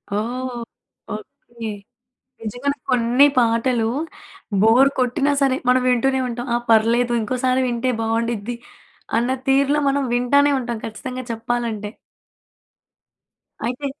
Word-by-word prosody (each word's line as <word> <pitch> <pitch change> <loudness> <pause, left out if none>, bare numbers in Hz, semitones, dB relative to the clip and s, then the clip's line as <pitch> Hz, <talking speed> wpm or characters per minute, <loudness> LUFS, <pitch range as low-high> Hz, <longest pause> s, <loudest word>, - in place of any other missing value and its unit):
ఓహ్! 245 +3 -3 0.6
Okay. 225 +1 -8 0.7
నిజంగానే 245 +6 -2
కొన్ని 250 +2 +4
పాటలు 230 0 +2 0.7
బోర్ 240 +5 +6
కొట్టినా 275 +3 +1
సరే, 265 -1 +3
మనవింటూనే 255 +1 +3
ఉంటాం. 240 +1 -5
ఆ! - - +4
పర్లేదు 235 +2 +3
ఇంకోసారి 255 +3 0
వింటే 240 +2 0
బావుండిద్ది 230 0 -1 0.6
అన్న 240 +2 0 0.2
తీరులో 280 +2 +3
మనం 280 +1 +1
వింటానే 280 +4 +3
ఉంటాం 235 -2 -4
ఖచ్చితంగా 255 +3 -6
చెప్పాలంటే. 225 -2 -3 1.8
అయితే 250 +4 -3
245 Hz, 100 wpm, -21 LUFS, 230-260 Hz, 1.8 s, బోర్